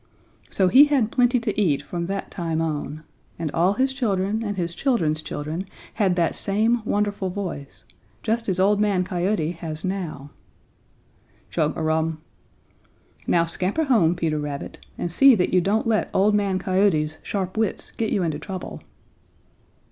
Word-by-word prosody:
"So 190 - +2
he 270 +10 +8
had 270 -7 +1
plenty 245 0 +3
to 215 -2 -1
eat 150 -8 +1
from 170 -1 -4
that 195 +1 -4
time 165 -3 -2
on. 155 -1 -3 0.3
And 160 -3 -3
all 175 +5 +2
his 265 +5 +1
children 210 -4 0
and 205 -2 -3
his 170 -1 -2
children's 170 - 0
children 155 +5 -5 0.3
had 195 -5 +1
that 170 -2 +1
same 220 +4 +1
wonderful 205 -2 -1
voice, 180 -7 -6 0.4
just 230 0 -1
as 185 -1 0
Old 205 +2 +3
Man 200 -3 +2
Coyote 180 -2 -1
has 165 -1 -5
now. 165 -7 -4 1.2
Chug 155 -2 0
a 160 - -2
rum! 160 0 0 1.1
Now 170 -1 +3
scamper 185 - -1
home, 215 - +3
Peter 160 -3 -1
Rabbit, 145 -1 -6
and 175 - -3
see 270 +8 +7
that 180 -4 0
you 180 - +5
don't 205 +5 +1
let 225 -2 +1
Old 205 +2 +4
Man 200 -2 +1
Coyote's 185 -6 +1
sharp 190 -2 -3
wits 220 -2 -2
get 225 -2 -2
you 195 - +1
into 155 -3 -2
trouble." 185 +3 -7
185 Hz, 160 wpm, -23 LUFS, 165-210 Hz, 1.2 s, he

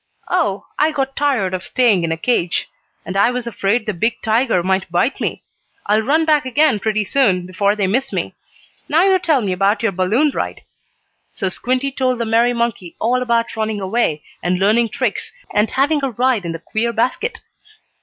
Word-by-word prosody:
"Oh, 255 - 0
I 305 +1 +3
got 270 -2 -2
tired 255 -11 0
of 185 0 -3
staying 230 -9 +2
in 165 - -1
a 165 - -1
cage. 175 -3 0 0.4
And 185 - -5
I 200 +4 +4
was 250 -1 -3
afraid 225 0 0
the 215 - -2
big 225 +7 -1
tiger 225 -4 +2
might 190 -1 0
bite 175 +10 0
me. - - -3 0.4
I'll 210 +2 +2
run 305 +8 +2
back 305 -2 +3
again 260 -3 +2
pretty 215 0 0
soon, 190 -7 +2
before 200 +3 0
they 205 -2 0
miss 260 +8 0
me. - - -3 0.6
Now 320 +4 +4
you 380 -1 +4
tell 320 -7 +2
me 200 -4 -1
about 195 +5 +1
your 225 - +2
balloon 210 +11 +1
ride." - - -4 0.7
So 190 - -2
Squinty 255 +7 -1
told 255 -2 0
the 235 - -2
merry 230 +2 +3
monkey 235 -7 -2
all 245 +3 +1
about 235 -2 0
running 220 -1 -2
away, 190 -7 -1 0.2
and 180 +1 0
learning 220 +5 +3
tricks, 240 -1 -2 0.2
and 210 +1 +2
having 285 +2 +1
a 275 - +1
ride 245 -4 0
in 170 - -2
the - - -4
queer 220 +7 -2
basket. 255 - -1
230 Hz, 195 wpm, -18 LUFS, 195-260 Hz, 0.7 s, I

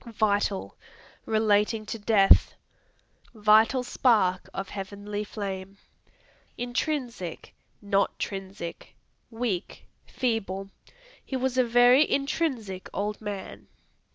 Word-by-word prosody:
Vital 205 -2 0 0.5
Relating 215 0 +2
to 225 - -5
death; 205 -2 +5 0.8
"Vital 220 +4 +4
spark 210 -7 +2
of 195 0 -5
heavenly 205 +1 -5
flame." 195 -2 -6 0.8
Intrinsic 245 - -3 0.3
not 200 -1 +1
trinsic. 195 -3 -6 0.3
Weak, 225 -6 -4 0.2
feeble; 195 -6 -2 0.5
"He 265 - -5
was 260 0 -1
a 255 - +4
very 245 +4 +5
intrinsic 265 - -2
old 205 +2 -3
man." 205 -2 -7
210 Hz, 90 wpm, -27 LUFS, 195-245 Hz, 0.8 s, death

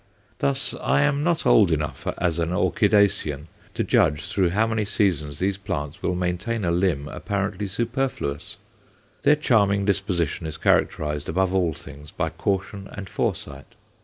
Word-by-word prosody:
Thus, 135 -2 0
I - - +2
am 145 0 +1
not 170 0 +1
old 105 -5 +6
enough 75 -3 -2
as 85 -1 0
an 85 -1 0
orchidacean 90 -6 +2 0.3
to - - 0
judge 75 -1 +2
through 95 -3 +1
how 105 +6 +2
many 110 -1 0
seasons 90 -9 0
these 95 +3 -1
plants 75 -2 -4
will 90 - 0
maintain 90 +5 -2
a 85 - +1
limb 85 -5 +1
apparently 100 +3 -3
superfluous. 115 - -3 0.6
Their 150 - +5
charming 100 -8 +2
disposition 90 -5 -1
is 80 0 -6
characterized 75 -2 +1
above 95 +3 +1
all 90 -5 +1
things 75 +2 -12
by 80 0 -2
caution 95 +3 -3
and 100 -1 -7
foresight. 70 -6 -4
95 Hz, 150 wpm, -24 LUFS, 80-105 Hz, 0.6 s, old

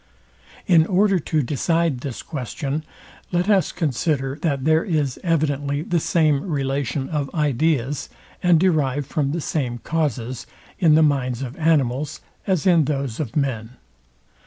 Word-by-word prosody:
In 165 -3 +5
order 195 0 +3
to 155 -1 0
decide 160 +2 0
this 130 -1 -6
question, 140 +1 -4 0.5
let 175 +1 +1
us 195 -3 +3
consider, 140 -3 -1
that 140 -5 -1
there 160 +1 +4
is 150 - -1
evidently 145 -4 0
the 175 0 0
same 155 -3 +2
relation 140 -3 -2
of 145 -4 -2
ideas, 145 -2 0 0.3
and 175 -3 +4
derived 145 -6 +1
from 145 -1 -1
the 165 +2 -2
same 130 -6 -2
causes, 130 -5 -2 0.3
in 165 -5 +5
the 160 - +5
minds 135 -4 0
of 130 +1 -6
animals 150 -4 +1 0.3
as 185 -6 +1
in 170 -5 +5
those 135 -5 -2
of 135 -8 -4
men. 125 -5 -2
145 Hz, 140 wpm, -22 LUFS, 135-165 Hz, 0.5 s, In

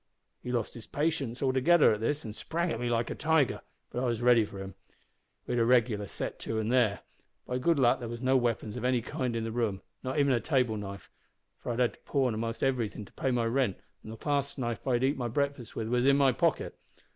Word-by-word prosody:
"He 125 - -5
lost 120 -3 -2 0.2
patience 145 -5 -1
altogether 135 +3 +5
at 105 - -3
this, 145 +6 -1
an' 110 - -5
sprang 170 +8 -2
at 115 - -3
me 120 0 -1
like 115 -1 0
a - - 0
tiger. 160 -4 +1 0.3
But 125 - -2
I 130 - 0
was 115 -2 0
ready 120 -2 +5
for 100 - -10
him. 95 0 -7 0.7
We - - -5
had 120 - +2
a - - +4
regular 115 -4 +3
set - - -5
to 115 - -4
then - - +1
an' 110 - -2
there. 120 -5 +3 0.5
By 125 0 -2
good 165 +5 +2
luck 125 -3 +4
there 120 -2 -5
was 120 0 -5
no 130 +1 +2
weapons 115 -3 0
of 125 - -5
any 125 -2 +1
kind 125 -1 -2
in 115 - -1
the 115 - -3
room, 110 -5 -1 0.2
not 130 +2 -3
even 140 -2 +4
a 120 - +2
table 125 -5 +1
knife, 100 -2 -7 0.5
for - - -4
I'd 115 - -3
had 125 -1 +2
to - - -20
pawn 130 -5 0
a'most 115 +1 -3
everything 120 -6 -1
to - - -19
pay 135 - -1
my 120 -2 +1
rent, 115 -4 +1 0.2
and 110 - -9
the 110 - -8
clasp 140 +2 -1
knife 120 -2 -3
I'd 125 -1 +2
eat 135 +3 +2
my 125 -2 -2
breakfast 140 0 -2
with 110 - -3
was 125 +2 +2
in 140 0 +6
my 135 -2 +5
pocket. - - 0
120 Hz, 245 wpm, -30 LUFS, 115-135 Hz, 0.7 s, in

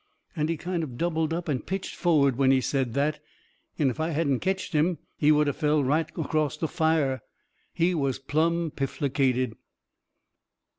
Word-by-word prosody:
And 155 -1 0
he 165 - -1
kind 175 +1 -2
of 130 -7 -6
doubled 160 -1 0
up 170 +1 -3
and 140 -5 -1
pitched 190 0 -4
forward 145 -7 +3
when 135 +1 +3
he 135 0 +5
said 130 -2 -1
that, 150 +2 +1 0.6
and 140 -4 +2
if 120 - -9
I 160 +1 0
hadn't 145 -5 +1
ketched 190 -1 -2
him 160 +3 +2 0.2
he 150 0 +3
would 150 0 +4
of 145 - -1
fell 150 -1 +2
right 150 +5 +1
acrost 155 -2 -1
the 160 - +1
fire. 155 -6 +1 0.5
He 175 +2 +1
was 140 -6 0
plumb 160 +4 0
pifflicated. 135 -3 0
150 Hz, 170 wpm, -27 LUFS, 135-165 Hz, 0.6 s, he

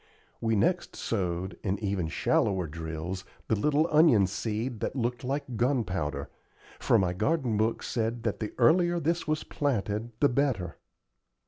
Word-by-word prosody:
We 115 -1 +1
next 175 - +1
sowed, 95 -3 -2
in 100 -1 0
even 100 -5 -1
shallower 95 +3 +1
drills, 80 +4 -5 0.3
the 110 - +3
little 150 +8 +2
onion 150 - +6
seed 110 +4 -3
that - - -3
looked 125 0 -2
like 130 -2 -3
gunpowder, 105 - 0 0.5
for - - +3
my 90 -2 +1
garden 130 - 0
book 110 +2 0
said 115 0 -2
that 110 - -1
the 110 - -3
earlier 175 +8 +4
this 170 +1 -1
was 155 0 0
planted 115 -5 -1
the 145 - +5
better. 120 - 0
115 Hz, 145 wpm, -29 LUFS, 95-140 Hz, 0.5 s, onion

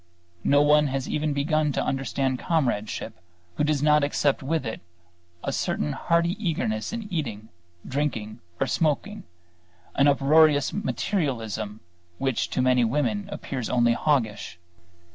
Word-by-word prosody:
No 145 +1 +4
one 150 0 +5
has 135 -1 -3
even 150 0 -1
begun 150 +1 +1
to - - 0
understand 135 -1 -1
comradeship 130 - -1 0.4
who - - +1
does 150 -1 +1
not 150 -1 +4
accept 145 -1 +1
with 145 +1 -1
it 110 - -5 0.6
a - - -1
certain 75 0 -1
hearty 170 0 +1
eagerness 110 - -1
in 230 -2 -5
eating, 110 -9 -3 0.4
drinking, 130 -7 -2 0.2
or - - +2
smoking, 185 +6 -1 0.7
an 140 - +3
uproarious 145 +1 +4
materialism 115 - -2 0.4
which 135 -3 -1
to 130 - 0
many 125 -1 +4
women 150 - 0
appears 135 - -4
only 120 -1 +3
hoggish. 115 - -1
140 Hz, 130 wpm, -25 LUFS, 120-155 Hz, 0.7 s, one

